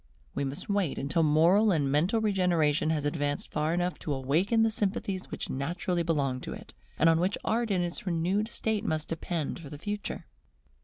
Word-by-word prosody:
We - - -1
must 135 +1 -3
wait 200 -7 0
until 140 +4 0
moral 170 +8 +5
and 145 -6 +1
mental 175 - +2
regeneration 175 -8 +2
has 150 -2 0
advanced 145 -1 -2
far 155 +1 0
enough 175 +1 -1
to 150 - -3
awaken 170 - +2
the 225 - +2
sympathies 195 -2 -2
which - - -4
naturally 170 +6 -2
belong 140 -6 0
to - - -5
it, - - -11 0.2
and 165 - +4
on 165 0 +5
which 185 +4 +1
Art 230 +1 0
in 185 -3 +1
its 175 +3 -5
renewed 180 +5 +1
state 220 -2 -1
must 155 -7 -2
depend 165 -1 -3
for 155 -4 -9
the 150 - -8
future. 205 +6 -4
170 Hz, 190 wpm, -29 LUFS, 150-200 Hz, 0.2 s, moral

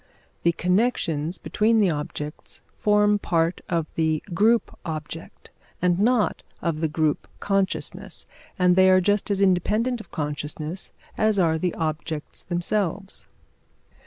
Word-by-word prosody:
The 170 - +3
connections 180 -4 0
between 215 +9 +2
the 195 -4 +4
objects 150 0 -5
form 210 0 +3
part 165 -2 0
of 170 -3 +1
the 160 -1 0
group 220 +6 +3
object 160 0 -7 0.3
and 180 0 +2
not 220 -3 +2 0.2
of 165 -2 -2
the 160 - +2
group 155 -1 0
consciousness, 195 -1 -1 0.3
and 180 -2 +4
they 190 0 +6
are 185 0 +6
just 205 +3 +1
as 200 -1 0
independent 210 +6 +2
of - - -16
consciousness 150 +3 -4 0.3
as 215 -1 +3
are 160 -4 +3
the 180 +1 -1
objects 155 -1 -3
themselves. 190 +2 -2
180 Hz, 130 wpm, -25 LUFS, 160-205 Hz, 0.3 s, they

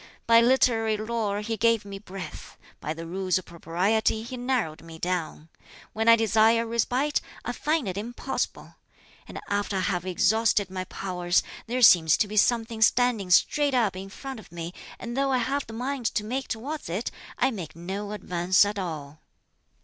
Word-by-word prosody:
By 230 0 +6
literary 230 -3 +3
lore 215 -2 -2
he 225 +1 -3
gave 230 0 +2
me 200 -1 -7
breadth; 195 -2 -9 0.2
by 155 - -4
the 165 +1 -7
Rules 185 +2 0
of 185 - -6
Propriety 185 +7 0
he 240 +3 -7
narrowed 245 -11 -1
me 165 -1 -11
down. 165 -2 -3 0.4
When 225 +1 +2
I 230 - +9
desire 225 +1 +3
a - - -6
respite, 245 +5 0 0.2
I - - -1
find 305 -6 -1
it 190 +1 -3
impossible; 240 +4 -4 0.5
and - - -7
after 205 0 -1
I - - 0
have 180 -2 -1
exhausted 205 +2 +2
my 185 -1 -4
powers, 180 -2 0 0.2
there 250 +2 0
seems 165 -7 +7
to 210 - +1
be 210 - -7
something 225 +1 +2
standing 230 -4 +3
straight 285 +9 +3
up 220 -7 +2
in 190 +1 -7
front 265 +4 -8
of 210 - -15
me, 170 0 -6 0.2
and 240 0 -6
though 275 0 +1
I 260 - +3
have 270 +3 -1
the 225 - -9
mind 250 +1 -2
to 210 - +1
make 255 +5 -3
towards 280 - -5
it 190 +8 -2 0.3
I 265 - +2
make 185 -10 -7
no 195 +5 -5
advance 185 -2 +2
at 205 0 -3
all." 155 -5 -6
215 Hz, 180 wpm, -26 LUFS, 185-235 Hz, 0.5 s, I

